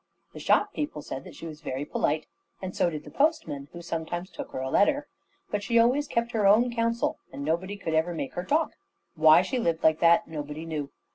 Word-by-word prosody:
The - - -8
shop 415 0 +2
people 225 - -4
said 135 - -6
that - - -11
she - - -9
was 155 -1 -8
very 135 -1 -3
polite, 155 +1 0 0.3
and 185 -1 -6
so 175 - +2
did 155 -2 -6
the - - -11
postman, 220 - 0
who 175 - -9
sometimes 170 +2 -4
took - - -7
her - - -6
a 130 0 -3
letter. 290 +7 +3 0.4
But 205 - 0
she 230 +4 +1
always 250 +6 +4
kept 235 +1 -1
her 215 -4 +2
own 235 +4 +5
counsel, 230 0 0
and 140 +1 -6
nobody 185 +6 -1
could 165 -5 -3
ever 165 +2 +1
make 140 - -4
her 175 - -3
talk. 310 - +1 0.4
Why 155 +2 +6
she 255 +4 -2
lived 170 -7 0
like 160 0 +4
that, 170 +5 +5
nobody 150 0 -6
knew. 150 -3 -4
170 Hz, 220 wpm, -27 LUFS, 155-230 Hz, 0.4 s, Why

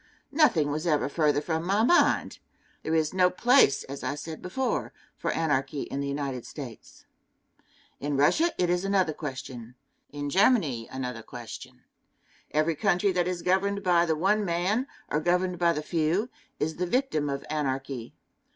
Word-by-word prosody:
Nothing 175 - +3
was 155 +4 -2
ever 150 -4 +2
further 145 0 +1
from 160 +1 -2
my 200 +5 +2
mind. 345 +9 +3 0.4
There 160 - -1
is 155 0 +1
no 180 -1 +4
place, 240 - +4
as 140 +1 -8
I 145 - -2
said 155 +2 -7
before, 255 +8 -2 0.2
for - - -3
anarchy 145 -3 0
in 140 - -5
the 140 - -2
United 140 -3 -3
States. 125 -7 -10 0.9
In 145 0 -2
Russia 310 - +3
it 180 - +2
is 175 +1 +1
another 195 -5 +1
question; 130 -5 -7 0.3
in 145 0 -5
Germany 170 - +2
another 125 -3 -4
question. 125 +2 -10 0.7
Every 155 +2 +1
country 195 +2 +2
that 180 -1 0
is 180 -2 -3
governed 200 +2 +1
by 175 -2 +3
the 160 - +2
one 200 +6 +2
man, 190 +8 0 0.2
or 150 - 0
governed 180 +2 0
by 170 -1 +4
the 150 -2 -3
few, 170 +8 0 0.3
is 160 +1 -2
the 180 +1 -1
victim 175 - 0
of 140 0 -4
anarchy. 135 -4 -3
160 Hz, 160 wpm, -27 LUFS, 140-185 Hz, 0.9 s, no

